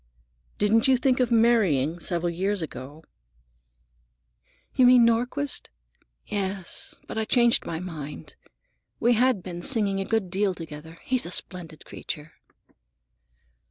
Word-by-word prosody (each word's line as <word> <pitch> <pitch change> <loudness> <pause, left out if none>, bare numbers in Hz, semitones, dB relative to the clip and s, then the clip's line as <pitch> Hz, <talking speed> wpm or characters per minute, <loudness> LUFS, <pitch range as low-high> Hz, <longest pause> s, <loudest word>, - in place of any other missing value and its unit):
"Didn't 220 +3 +3
you 260 -1 +5
think 255 0 +2
of 250 -2 +2
marrying, 195 - +3
several 175 0 -1
years 190 +2 -1
ago?" 145 +1 -8 1.7
"You 255 - +5
mean 250 -1 +7
Nordquist? 245 +5 0 0.6
Yes; 195 -2 -3
but - - -4
I - - +1
changed 235 0 +3
my 160 - -3
mind. 155 -5 -8 0.6
We 240 +1 +4
had 240 -4 +2
been 175 -1 -6
singing 205 -4 +2
a 195 - -2
good 215 -5 -1
deal 195 0 +1
together. 160 0 -9
He's 255 -7 -1
a - - -7
splendid 170 -4 -6
creature." 150 +1 -7
195 Hz, 125 wpm, -26 LUFS, 165-235 Hz, 1.7 s, mean